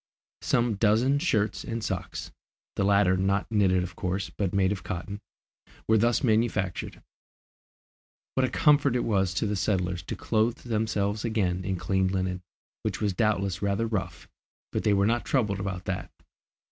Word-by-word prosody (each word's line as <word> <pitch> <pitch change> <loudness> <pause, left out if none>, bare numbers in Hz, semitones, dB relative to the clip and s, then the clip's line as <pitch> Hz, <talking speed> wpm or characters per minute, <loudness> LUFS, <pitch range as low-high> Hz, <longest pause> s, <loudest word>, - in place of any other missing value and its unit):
Some 120 -3 +1
dozen 115 +7 +3
shirts 110 - 0
and 115 -1 -4
socks - - -4 0.4
the - - 0
latter 100 -2 +4
not 95 +2 +1
knitted 95 -4 +3
of 90 0 -7
course, 95 +1 -2
but 100 -3 -2
made 95 0 +2
of 95 -3 -3
cotton 100 +4 -5 0.7
were 110 0 +4
thus 120 +5 +2
manufactured. 110 -5 0 1.3
What 130 - +1
a 130 - +2
comfort 145 -4 +3
it 125 - +1
was 95 -4 +1
to 110 - 0
the 105 0 -1
settlers 90 -3 0
to - - -5
clothe 110 +2 0
themselves 110 -3 -1
again 95 -6 0
in 95 0 -1
clean 95 +1 0
linen, 95 -1 -2 0.4
which - - -3
was 105 -3 0
doubtless 100 -3 0
rather 100 +2 0
rough, 95 -6 -4 0.4
but - - -2
they 105 - +3
were 100 0 +3
not 120 +3 +1
troubled 105 -7 0
about 95 -2 -4
that! 90 -1 -3
100 Hz, 160 wpm, -27 LUFS, 95-110 Hz, 1.3 s, latter